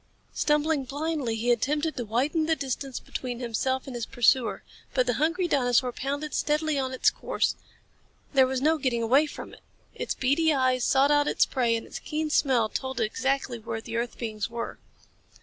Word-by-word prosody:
Stumbling 300 -1 +1
blindly 285 -3 -2
he 235 +2 +1
attempted 295 +7 0
to 240 - -3
widen 280 +9 0
the 325 - +3
distance 270 -2 -4
between 245 -2 -5
himself 260 +2 -1
and 265 - -7
his 235 -2 -3
pursuer. 245 0 +2 0.3
But 255 - +3
the 245 - +1
hungry 345 +3 +1
dinosaur 250 -4 +2
pounded 285 +4 -4
steadily 300 -1 +1
on 260 -1 -2
its 260 - +3
course. - - -1 0.8
There 265 -2 +5
was 260 0 -2
no 315 +1 +3
getting 240 -5 0
away 270 +7 +4
from - - -9
it. - - -15 0.3
Its - - -3
beady 300 +5 +2
eyes 255 -2 +2
sought 275 +2 +4
out 290 0 +3
its - - +3
prey 240 -4 +1
and 225 - -4
its - - -7
keen 305 0 -3
smell 255 -7 +3
told 260 +3 -4
it - - +2
exactly 260 +1 -1
where 225 0 -4
the 230 +1 -7
earth 235 +1 -2
beings 220 -2 -3
were. 235 0 -5
260 Hz, 185 wpm, -27 LUFS, 240-295 Hz, 0.8 s, There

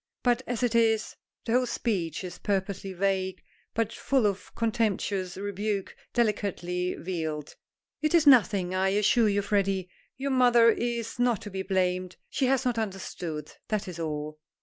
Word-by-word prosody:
But 245 0 +3
as 245 -1 -2
it 240 -2 +2
is 225 -2 +2
" - - -52
The - - -2
whole 250 +1 +3
speech 195 - -2
is 180 -1 -7
purposely 195 -1 -2
vague, 190 0 -1 0.3
but 230 0 0
full 265 -2 +1
of 200 -1 -1
contemptuous 210 -5 -1
rebuke, 200 0 -3 0.2
delicately 190 -6 0
veiled. 160 -4 -4 0.5
"It 310 +2 +2
is 325 -2 +5
nothing, 205 -9 +5
I 190 +1 +2
assure 210 +3 +3
you, 205 0 +1
Freddy. 195 -2 0 0.3
Your 275 +1 -2
mother 240 -3 +6
is 235 -1 -3
not 245 -4 +2
to 205 - -7
be 190 0 -3
blamed. 185 -1 0 0.2
She 265 - +1
has 265 0 +2
not 245 -2 +1
understood. 180 -7 -4 0.2
That 215 -3 -1
is 175 -2 -7
all." 155 -1 -4
200 Hz, 160 wpm, -28 LUFS, 185-235 Hz, 0.5 s, mother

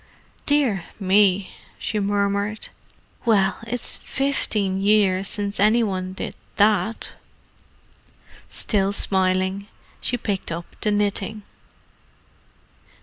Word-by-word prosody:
"Dear 265 -11 +2
me!" 195 -1 +3 0.3
she 215 - -2
murmured. 200 +1 -1 0.5
"Well, 195 -5 +2
it's 245 +1 -3
fifteen 210 -8 -1
years 195 -2 +3
since 205 0 -3
any 215 +4 +4
one 185 -3 -2
did - - -5 0.2
that." 215 +2 +2 1.4
Still 200 -2 0
smiling, 190 0 +1 0.3
she 245 - 0
picked 200 -6 -3
up 170 +1 -4 0.2
the 215 - +1
knitting. 205 0 0
200 Hz, 90 wpm, -23 LUFS, 190-215 Hz, 1.4 s, any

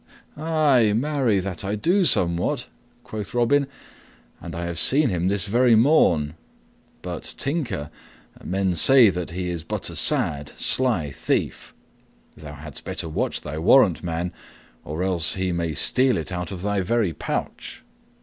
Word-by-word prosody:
"Ay, 145 -8 +2
marry, 130 -5 +1
that 95 -1 -5
I 100 +2 -2
do 180 - +2
somewhat," 85 - 0 0.4
quoth 105 0 -7
Robin, 135 +4 +2 0.7
"and - - -8
I 85 +1 -4
have 85 -1 -2
seen 140 - +3
him 90 -2 -1
this 100 0 0
very 120 +3 +3
morn. 100 - +3 0.7
But, - - -5
Tinker, 125 - -3 0.5
men 95 0 -1
say 120 +4 +6
that 90 -1 -5
he 90 +1 -4
is 85 -2 -5
but - - -4
a - - -9
sad, 70 0 0
sly 110 - +2
thief. - - -3 0.6
Thou 75 -1 -10
hadst 75 -1 -8
better - - -4
watch 80 - -2
thy 75 +2 -6
warrant, 95 0 +4
man, 85 +1 -3 0.5
or 80 +4 -4
else 90 -4 +2
he 95 -1 -1
may 85 -2 -2
steal 125 - +3
it 80 +2 -5
out 90 0 -4
of 95 -2 -7
thy 100 -1 0
very 105 -2 0
pouch." - - -5
95 Hz, 150 wpm, -23 LUFS, 85-125 Hz, 0.7 s, say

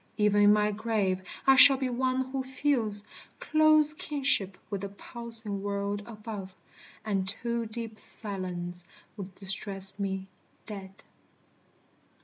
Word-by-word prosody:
Even 210 -1 +3
in 205 0 +7
my 210 0 +3
grave 205 -3 -1 0.2
I 270 0 +7
shall 270 +1 +9
be 260 0 -1
one 260 +1 -1
who 270 0 -1
feels 260 -6 -1 0.4
Close 310 -1 +5
kinship 265 -12 0
with 200 -2 -3
the 200 - -4
pulsing 225 -1 -6
world 200 0 -2
above; 210 -4 -8 0.5
And 195 -3 -1
too 235 +2 -3
deep 225 0 -7
silence 180 -4 -3 0.3
would 195 -3 -8
distress 195 0 0
me, 190 -1 -2 0.4
dead. 195 -2 -9
210 Hz, 125 wpm, -29 LUFS, 195-240 Hz, 0.5 s, shall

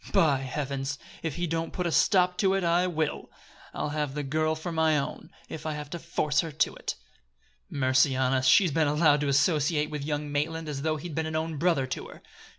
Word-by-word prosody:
By 160 -9 +4
heavens! 135 0 -3 0.2
if 160 -4 -3
he 175 +1 -1
don't 165 0 -3
put 180 - -2
a 170 - 0
stop 180 0 +3
to 195 -1 +3
it, 195 - 0
I 175 +2 +2
will. 160 -4 -2 0.4
I'll - - -3
have 150 -2 -2
the 150 - -2
girl 155 +3 0
for 160 +2 -5
my 160 -1 +2
own, 140 - -4 0.2
if 155 - -7
I 155 - -1
have 150 -1 -7
to 170 - -4
force 155 -2 0
her 165 -2 -1
to 150 +1 0
it! - - -4 0.7
Mercy 130 0 +2
on 130 0 +2
us! 130 0 +1
she's 180 +4 +5
been 155 +1 +2
allowed 150 0 +3
to 145 - 0
associate 150 +1 +2
with 150 -2 -4
young 145 0 -3
Maitland 160 +3 -2
as 145 -2 -4
though 155 +1 0
he'd 165 +2 -7
been 160 +1 -1
an 160 - -4
own 160 0 -2
brother 165 -5 +2
to 130 - -5
her! - - -14
155 Hz, 225 wpm, -27 LUFS, 145-165 Hz, 0.7 s, she's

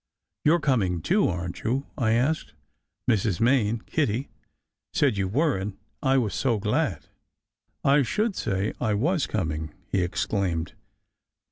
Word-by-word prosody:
"You 150 - +5
re - - +1
coming, 95 - +1
too, - - +3
aren 85 0 -3
t - - -11
you?" 130 +5 0
I 110 -5 +2
asked. 140 +7 0 0.5
"Mrs. 105 -6 +2
Main 115 -2 +2
Kitty 135 -3 0 0.6
said 140 -7 +3
you 100 -1 0
were, 145 - +2
and 95 +1 -5 0.2
I 135 -1 +3
was 110 -7 +1
so 125 -4 +1
glad." 105 +1 0 0.8
"I 140 +1 +5
should 210 - 0
say 100 -1 -1
I 110 -4 +1
was 155 - +1
coming!" 80 -6 -3 0.2
he 95 - +2
exclaimed. 90 -2 -1
110 Hz, 145 wpm, -26 LUFS, 95-135 Hz, 0.8 s, You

